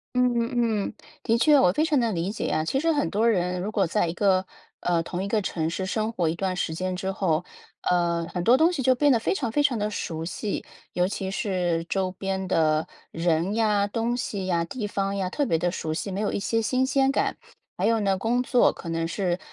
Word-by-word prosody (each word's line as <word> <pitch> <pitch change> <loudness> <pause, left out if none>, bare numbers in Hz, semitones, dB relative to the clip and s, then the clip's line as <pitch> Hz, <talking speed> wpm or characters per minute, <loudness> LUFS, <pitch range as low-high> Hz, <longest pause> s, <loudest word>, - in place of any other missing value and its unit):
嗯 250 0 +3
嗯 235 +1 0 0.4
嗯， - - -11 0.3
的 225 - +2
确， 290 +4 +6
我 180 - +5
非 300 - +1
常 310 -4 +2
能 230 -3 +1
理 175 +2 -1
解 220 - -4
啊。 155 - 0
其 265 +12 0
实 330 +2 +2
很 290 -1 0
多 215 +3 +1
人 180 -4 +1
如 210 - -3
果 200 -4 +1
在 210 +3 +1
一 165 - -2
个 190 -1 +2 0.4
呃， 170 -1 +1
同 175 +3 -4
一 - - -3
个 215 +1 +1
城 160 -4 -2
市 190 +2 -3
生 215 +3 -1
活 175 -7 0
一 160 - -1
段 185 +1 -2
时 160 -2 -2
间 185 +2 -2
之 190 +1 -2
后， 175 -4 0 0.4
呃， 170 -1 +1
很 180 - -2
多 240 +7 +6
东 320 +5 +4
西 295 -7 -2
就 260 - +5
变 285 +3 +3
得 245 - +5
非 220 - 0
常 260 -11 -2
非 290 +5 +2
常 255 -6 +2
地 210 0 0
熟 160 -6 -4
悉， 195 +4 -3 0.3
尤 180 0 +2
其 190 -1 -4
是 180 -5 -1
周 190 +1 -1
边 190 0 -3
的 155 -2 +2 0.2
人 170 +3 0
呀、 210 -3 +2
东 230 +3 -1
西 210 -7 -3
呀、 170 -2 +1
地 210 +6 -5
方 200 -1 -2
呀， 185 -1 -2
特 285 - 0
别 165 - +2
地 175 +2 0
熟 160 -3 -4
悉， 175 +5 -3
没 195 +2 -2
有 210 - 0
一 - - -2
些 225 +3 0
新 255 +4 +1
鲜 270 0 +2
感。 - - 0 0.4
还 190 - 0
有 225 0 +3
呢， 195 -1 +2
工 240 +4 +1
作 250 -1 +4
可 - - -10
能 165 0 -1
是， 180 0 -1
195 Hz, 260 characters per minute, -25 LUFS, 175-230 Hz, 0.4 s, 确